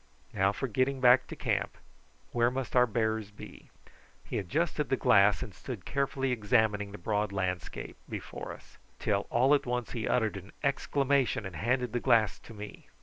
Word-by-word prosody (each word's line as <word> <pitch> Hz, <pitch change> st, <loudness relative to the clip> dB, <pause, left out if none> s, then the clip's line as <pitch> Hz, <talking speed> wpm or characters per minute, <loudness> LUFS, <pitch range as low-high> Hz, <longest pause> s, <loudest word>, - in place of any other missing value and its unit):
"Now 95 Hz, -2 st, +3 dB
for 135 Hz, +6 st, -3 dB
getting 130 Hz, +3 st, 0 dB
back 125 Hz, 0 st, +6 dB
to -, -, -7 dB
camp. -, -, -1 dB, 0.5 s
Where 120 Hz, 0 st, +3 dB
must 130 Hz, 0 st, -4 dB
our 125 Hz, 0 st, +6 dB
bearers 110 Hz, -2 st, -1 dB
be?" 105 Hz, -, -12 dB, 0.6 s
He -, -, -2 dB
adjusted 150 Hz, -, -1 dB
the 135 Hz, -, +2 dB
glass 100 Hz, -, +4 dB
and -, -, -8 dB
stood -, -, -7 dB
carefully 135 Hz, -1 st, -1 dB
examining 105 Hz, -3 st, +1 dB
the 105 Hz, -, -8 dB
broad 105 Hz, +2 st, -1 dB
landscape 95 Hz, -2 st, -3 dB
before -, -, -6 dB
us, -, -, -14 dB, 0.2 s
till -, -, 0 dB
all 130 Hz, +4 st, +4 dB
at 145 Hz, -, +2 dB
once 125 Hz, -1 st, -2 dB
he 115 Hz, -2 st, -3 dB
uttered 110 Hz, -4 st, +1 dB
an 95 Hz, +1 st, -11 dB
exclamation, 140 Hz, -4 st, +1 dB
and 95 Hz, -3 st, -7 dB
handed 125 Hz, +6 st, 0 dB
the 120 Hz, -, +1 dB
glass 115 Hz, -4 st, +3 dB
to -, -, -14 dB
me. 105 Hz, 0 st, -9 dB
120 Hz, 175 wpm, -30 LUFS, 105-130 Hz, 0.6 s, back